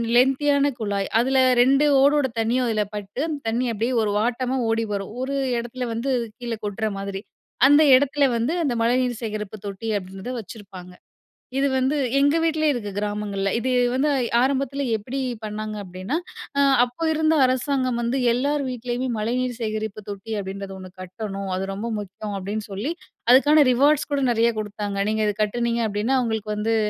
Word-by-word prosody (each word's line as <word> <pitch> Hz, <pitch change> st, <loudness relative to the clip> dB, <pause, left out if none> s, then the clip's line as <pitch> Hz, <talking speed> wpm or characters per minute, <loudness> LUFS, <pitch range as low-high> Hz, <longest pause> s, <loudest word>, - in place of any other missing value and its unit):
Length 260 Hz, +2 st, +5 dB
தியான 285 Hz, -1 st, +3 dB
குழாய். 200 Hz, -3 st, -1 dB
அதில 265 Hz, +2 st, +2 dB, 0.2 s
2 275 Hz, +4 st, +4 dB, 0.2 s
ஓடோட 285 Hz, 0 st, +4 dB
தண்ணியும் 240 Hz, +3 st, +1 dB
அதில 215 Hz, -2 st, +1 dB
பட்டு 205 Hz, +4 st, -6 dB
அந்த 300 Hz, -3 st, -3 dB
தண்ணி 240 Hz, +3 st, 0 dB
அப்பிடியே 230 Hz, +4 st, -1 dB
ஒரு 210 Hz, -, 0 dB
வாட்டமா 250 Hz, +3 st, 0 dB
ஓடி 225 Hz, 0 st, +1 dB
வரும். 200 Hz, +1 st, -4 dB
ஒரு 275 Hz, +2 st, -2 dB, 0.2 s
இடத்துல 240 Hz, +1 st, -5 dB
வந்து 235 Hz, +4 st, -2 dB, 0.3 s
கீழே 235 Hz, -2 st, -4 dB
கொட்ற 215 Hz, +2 st, -2 dB
மாதிரி. 195 Hz, 0 st, -5 dB, 0.5 s
அந்த 290 Hz, +2 st, +6 dB
இடத்தில 285 Hz, +2 st, +3 dB
வந்து, 235 Hz, +8 st, 0 dB
அந்த 285 Hz, -6 st, 0 dB
மழைநீர் 245 Hz, 0 st, +1 dB
சேகரிப்பு 215 Hz, -2 st, -4 dB
தொட்டி 200 Hz, +2 st, -6 dB
அப்பிடின்றத 195 Hz, +5 st, -7 dB
வச்சிருப்பாங்க. 195 Hz, -4 st, -10 dB, 0.6 s
இது 275 Hz, +1 st, +3 dB
வந்து 260 Hz, +3 st, +1 dB, 0.2 s
எங்க 285 Hz, +3 st, +3 dB
வீட்லயே 310 Hz, -2 st, +2 dB
இருக்கு 215 Hz, -5 st, -4 dB
கிராமங்கள்ல. 205 Hz, -1 st, -2 dB
இது 255 Hz, +2 st, -1 dB, 0.2 s
வந்து 270 Hz, +4 st, +1 dB, 0.3 s
ஆரம்பத்தில 275 Hz, +1 st, 0 dB
எப்பிடி 245 Hz, +6 st, -4 dB, 0.2 s
பண்ணாங்க 215 Hz, 0 st, -4 dB
அப்பிடின்னா, 185 Hz, -, -4 dB, 0.4 s
அ -, -, +5 dB, 0.2 s
அப்ப 245 Hz, +3 st, -5 dB
இருந்த 315 Hz, 0 st, +2 dB
அரசாங்கம் 255 Hz, -1 st, 0 dB
வந்து 240 Hz, +3 st, 0 dB, 0.2 s
எல்லார் 280 Hz, +4 st, 0 dB
வீட்லேயுமே 250 Hz, +1 st, -3 dB
மழைநீர் 245 Hz, +3 st, -1 dB
சேகரிப்பு 215 Hz, -2 st, -3 dB
தொட்டி 205 Hz, +2 st, -6 dB
அப்பிடின்றது 195 Hz, 0 st, -6 dB
1 185 Hz, -1 st, -10 dB
கட்டணும். 195 Hz, +1 st, -6 dB
அது 190 Hz, +1 st, -2 dB
ரொம்ப 215 Hz, +4 st, -4 dB
முக்கியம் 205 Hz, +1 st, -6 dB
அப்பிடின்னு 205 Hz, +3 st, -4 dB
சொல்லி, 205 Hz, +10 st, -3 dB, 0.4 s
அதுக்கான 295 Hz, +3 st, +6 dB
ரிவார்ட்ஸ் 285 Hz, +5 st, +3 dB
கூட 285 Hz, -1 st, +1 dB
நிறைய 235 Hz, 0 st, +3 dB
குடுத்தாங்க. 205 Hz, -1 st, -4 dB
நீங்க 220 Hz, 0 st, 0 dB
இத 210 Hz, -, +1 dB
கட்டுனீங்க 235 Hz, +2 st, 0 dB
அப்பிடின்னா, 215 Hz, +6 st, 0 dB
உங்ங்களுக்கு 220 Hz, -2 st, -2 dB
வந்து 220 Hz, +2 st, 0 dB
230 Hz, 160 wpm, -23 LUFS, 205-265 Hz, 0.6 s, அந்த